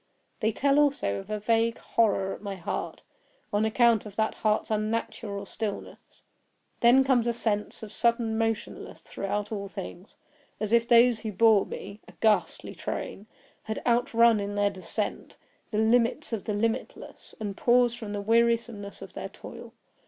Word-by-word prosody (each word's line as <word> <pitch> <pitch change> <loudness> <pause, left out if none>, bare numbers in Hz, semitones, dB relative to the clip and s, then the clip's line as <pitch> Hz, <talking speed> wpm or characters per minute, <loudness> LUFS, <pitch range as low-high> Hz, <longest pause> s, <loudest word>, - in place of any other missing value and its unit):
They 220 0 +1
tell 280 +5 +2
also 280 - +1
of 195 - -11
a 215 0 -2
vague 230 +2 +1
horror 195 -4 +1
at - - -10
my 200 -2 -5
heart, 180 - -5 0.5
on 210 +1 +2
account 230 0 +3
of 210 -2 -10
that 220 0 0
heart's 215 0 0
unnatural 215 -1 -2
stillness. 210 +1 -7 0.6
Then 245 +3 +6
comes 255 -3 +2
a 235 - +1
sense 215 -2 -2
of 215 -1 -8
sudden 235 -1 +1
motionlessness 225 -1 -3
throughout 205 +2 -4
all 200 -2 -4
things; 195 -1 -9 0.4
as 215 +1 -2
if 235 0 +4
those 240 -1 +5
who 220 - -4
bore 215 0 +4
me 200 +2 -8
(a - - -14
ghastly 215 -2 0
train!) 205 - -5 0.3
had 220 0 -4
outrun, 235 -2 +4
in 205 0 -4
their 205 0 +2
descent, 195 +3 -4 0.3
the 210 - -3
limits 235 +5 +2
of 215 - -3
the 210 - -1
limitless, 230 +4 -4
and 205 -3 -4
paused 240 +1 +3
from 215 -3 -6
the 205 -1 -3
wearisomeness 230 -2 +1
of - - -11
their - - -6
toil. - - -11
220 Hz, 160 wpm, -27 LUFS, 205-235 Hz, 0.6 s, Then